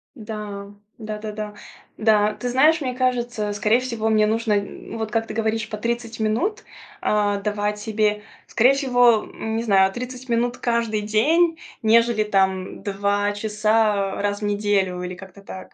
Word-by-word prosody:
Да, 210 -3 -7 0.2
да-да-да. 215 -1 -6 0.4
Да, 215 -1 +3
ты 245 - -4
знаешь, 300 +6 +4
мне 255 -2 -2
кажется, 240 -4 -1
скорее 210 +3 +2
всего 230 -4 -2
мне 215 -1 +4
нужно, 225 0 0
м, 200 +2 -4
вот 220 -1 -4
как 225 +1 0
ты - - -6
говоришь, 220 0 -1
по 215 - -4
30 235 +1 -3
минут, 225 - 0 0.4
а, 205 -1 +1
давать 210 0 -2
себе 210 -1 0 0.2
скорее 250 +4 +4
всего, 245 -5 +3
м, 220 0 -5
не 230 - -1
знаю, 195 -3 +4
30 250 +1 -7
минут 240 +1 0
каждый 230 -3 0
день, 320 +11 +2 0.2
нежели 230 0 +4
там 190 -2 0
2 205 0 0
часа 210 -1 +1
раз 205 0 -1
в - - -2
неделю 200 -3 0
или 180 0 -5
как-то 190 +1 -13
так. 190 -1 -10
215 Hz, 155 wpm, -22 LUFS, 205-235 Hz, 0.4 s, знаешь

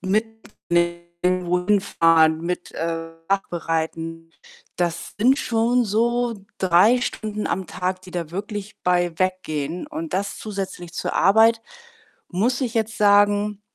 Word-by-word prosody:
mit 210 +4 +2 0.5
dem 175 +1 0
wohin 180 +3 +2
fahren, 160 -3 +4
mit, 175 +1 -4
äh, 165 0 -3 0.2
Nachbereiten, 165 -3 -2 0.5
das 175 -1 -2
sind 260 +6 +4
schon 235 +1 +1
so 235 +3 +1 0.2
3 190 +7 +4
Stunden 215 -3 -3
am 190 -1 -2
Tag, 185 +1 -3
die 185 - -12
da 170 -3 -4
wirklich 205 +2 -6
bei 175 -1 +2
weggehen 180 - -2
und 315 +1 -5
das 200 +1 -2
zusätzlich 195 -5 -6
zur - - -3
Arbeit, 225 +4 +5 0.7
muss 240 +9 0
ich 240 - -1
jetzt 220 -1 -1
sagen 205 0 +3
185 Hz, 125 wpm, -22 LUFS, 170-215 Hz, 0.7 s, Arbeit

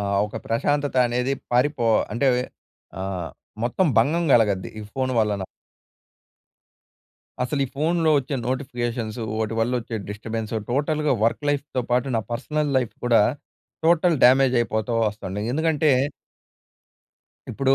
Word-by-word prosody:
ఆహ్, 100 -1 0
ఒక 105 - -7
ప్రశాంతత 145 +4 0
అనేది 125 +3 0 0.2
పారిపో 125 -1 +2 0.3
అంటే 135 +3 +2 0.7
ఆహ్, 95 -3 -3 0.4
మొత్తం 170 +9 +1
భంగం 165 +7 +1
కలగద్ది 105 -5 +2
ఈ - - -6
ఫోన్ 130 -1 -1
వలన. 105 -2 0 2.0
అసలు 140 +3 -1
ఈ - - -3
ఫోన్‌లో 160 +1 +2
వచ్చే 140 +2 -3
నోటిఫికేషన్సు, 120 -3 -3
వోటి 110 0 -2
వల్లొచ్చే 120 -1 -1
డిస్టర్బెన్సు, 110 +1 -4
టోటల్‌గా 150 +2 +1
వర్క్ 115 +5 0
లైఫ్‌తో 140 -3 -2
పాటు, 125 +2 +2
నా - - +1
పర్సనల్ 145 +4 -1
లైఫ్ 125 -4 -3
కూడా, 115 -3 +5 0.6
టోటల్ 170 -1 +4
డ్యామేజ్ 130 0 +5
అయిపోతో 110 +1 -1
వస్తంది. 105 -1 -5
ఎందుకంటే 155 0 +2 1.6
ఇప్పుడు 135 +4 +2
125 Hz, 120 wpm, -23 LUFS, 110-145 Hz, 2.0 s, కూడా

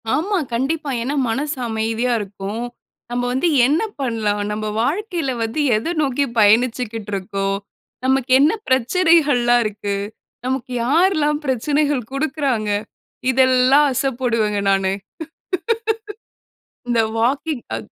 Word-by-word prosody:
ஆமா. 385 +6 0 0.2
கண்டிப்பா. 285 +5 -1
ஏன்னா 270 +5 -2
மனசு 285 +5 -2
அமைதியா 225 +2 0
இருக்கும். 200 +2 -5 0.5
நம்ம 245 0 -1
வந்து 265 +7 +1 0.2
என்ன 295 +5 +2 0.2
பண்லாம்? 220 -5 -1
நம்ப 215 0 -3
வாழ்க்கைல 335 - -1
வந்து 225 +7 -3 0.2
எதை 220 +10 -1
நோக்கி 280 -1 +1
பயணிச்சிகிட்ருக்கோம்? 210 -3 +1 0.5
நமக்கு 265 0 +1
என்ன 295 +6 +4
பிரச்சனைகள்லாம் 260 -3 +3
இருக்கு? 205 -1 -3 0.5
நமக்கு 260 0 -2
யார்லாம் 300 +1 +2
பிரச்சனைகள் 280 -1 0
குடுக்குறாங்க? 275 -6 -1 0.6
இதெல்லாம் 260 +2 +4
அசபோடுவேங்க 235 -6 0
நானு. 195 -1 +1 2.0
இந்த 235 -1 +2 0.2
வாக்கிங். 265 +3 0
அ - - -2
255 Hz, 100 wpm, -20 LUFS, 220-290 Hz, 2.0 s, என்ன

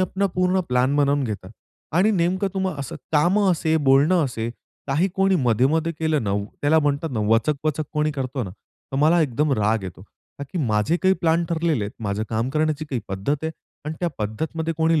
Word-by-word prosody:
आपण 195 +2 0
पूर्ण 185 +1 +2
प्लॅन 125 +3 +2
बनवून 145 0 +2
घेता 105 -3 -5 0.5
आणि 200 +5 +4
नेमकं 185 +1 +1
तुम्हाला 190 -6 -2
असं 135 - -6 0.2
काम 175 +7 +3
असेल, 165 -4 +2
बोलणं 145 +5 +4
असेल, 115 -3 -3 0.4
काही 155 +8 +1
कोणी 195 0 +3
मध्ये-मध्ये 140 +8 +2
केलं 160 -4 +1
ना, 100 - -1 0.3
त्याला 155 +2 +4
म्हणतात 145 +1 0
ना 110 - -1
वचक-वचक 150 +6 +1
कोणी 150 0 +1
करतो 130 -2 -3
ना, 95 - -5
तर 110 +7 -12
मला 165 +2 +5
एकदम 145 +2 0
राग 105 +1 +1
येतो. 95 0 -8 0.4
का 140 - -4
की 180 - -2
माझे 105 +10 +1
काही 190 0 +4
प्लॅन 165 0 +2
ठरलेले 160 -9 0
आहेत, 100 - -6 0.2
माझं 100 +2 -1
काम 115 +3 -1
करण्याची 155 +1 0
काही 125 - -1
पद्धत 100 +10 -1
आहे 160 - -1 0.3
अन् 155 - -3
त्या 175 - +1
पद्धतीमध्ये 160 +10 -2
कोणी 160 -1 +3
150 Hz, 190 wpm, -23 LUFS, 125-165 Hz, 0.5 s, मला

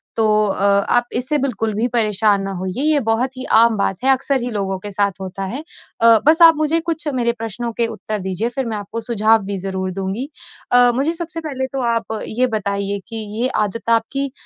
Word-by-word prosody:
तो 225 - +1 0.2
अ, 195 0 -1 0.3
आप 240 0 +3
इससे 255 +5 0
बिल्कुल 225 -5 -2
भी 225 +4 0
परेशान 210 -3 +3
ना 195 0 -4
होइए 190 +7 -3
ये 305 -1 +3
बहुत 250 +4 0
ही 260 - -5
आम 230 0 +5
बात 195 -1 -1
है, 270 - +3
अक्सर 270 0 +1
ही 245 - -3
लोगों 195 -2 -2
के 205 +2 -6
साथ 200 -1 -1
होता 190 +1 -6
है। 245 +9 -5 0.4
अ, 230 -1 +7
बस 320 +2 +5
आप 330 -1 +8
मुझे 310 +2 +1
कुछ 320 -2 -3
मेरे 235 -1 +1
प्रश्नों 225 +1 -4
के 235 0 +1
उत्तर 215 -1 -5
दीजिए 190 +5 -2
फिर 265 -2 -2
मैं 220 -2 -3
आपको 215 +3 -6
सुझाव 220 -1 +2
भी 200 -1 -3
ज़रूर 190 0 -4
दूँगी। 195 +8 -4 0.4
अ, 245 0 +6
मुझे 290 +6 0
सबसे 335 -1 -5
पहले 265 -2 -3
तो 265 - -1
आप 220 -1 -3
ये 250 +3 +1
बताइए 200 0 -2
कि, 225 - -7 0.3
ये 250 - +3 0.2
आदत 230 +3 -7
आपकी 260 +4 0
230 Hz, 210 wpm, -19 LUFS, 200-260 Hz, 0.4 s, आप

